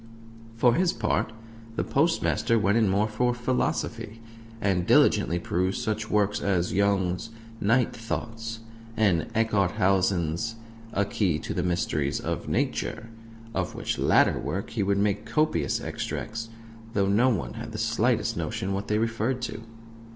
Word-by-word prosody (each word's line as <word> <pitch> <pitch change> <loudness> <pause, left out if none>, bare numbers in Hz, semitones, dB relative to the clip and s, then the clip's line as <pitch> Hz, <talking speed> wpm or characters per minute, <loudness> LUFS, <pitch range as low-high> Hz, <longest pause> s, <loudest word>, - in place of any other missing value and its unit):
For 120 +1 +4
his 180 +3 +2
part, - - 0 0.4
the - - 0
Postmaster 140 -6 +2
went 105 -1 +2
in 110 -3 +3
more 100 +3 +2
for 120 +3 0
philosophy, 120 -2 -2 0.4
and 95 -4 0
diligently 85 - +4
perused 90 +2 -1
such 110 0 -2
works 105 -1 +2
as 90 -3 0
Young's 95 0 +1 0.3
Night 115 +4 +2
Thoughts, 115 0 -5 0.4
and 100 -4 +2
Eckharthausen's 95 -2 +1 0.4
A 100 - +2
Key 95 -5 0
to - - -5
the 90 - -1
Mysteries 85 -5 0
of - - -3
Nature; 115 - -1 0.4
of 90 -2 -2
which - - -3
latter - - +4
work 95 - -4
he 115 - -1
would 100 0 +2
make 100 +1 +1
copious 115 - +1
extracts, 115 +1 -4 0.5
though 100 -1 +2
no 110 +6 +4
one 105 -9 -1
had - - -7
the - - -6
slightest - - +1
notion 95 +1 -2
what 100 +1 -3
they 105 - +1
referred 115 +3 0
to. 110 -2 -4
105 Hz, 145 wpm, -27 LUFS, 95-115 Hz, 0.5 s, For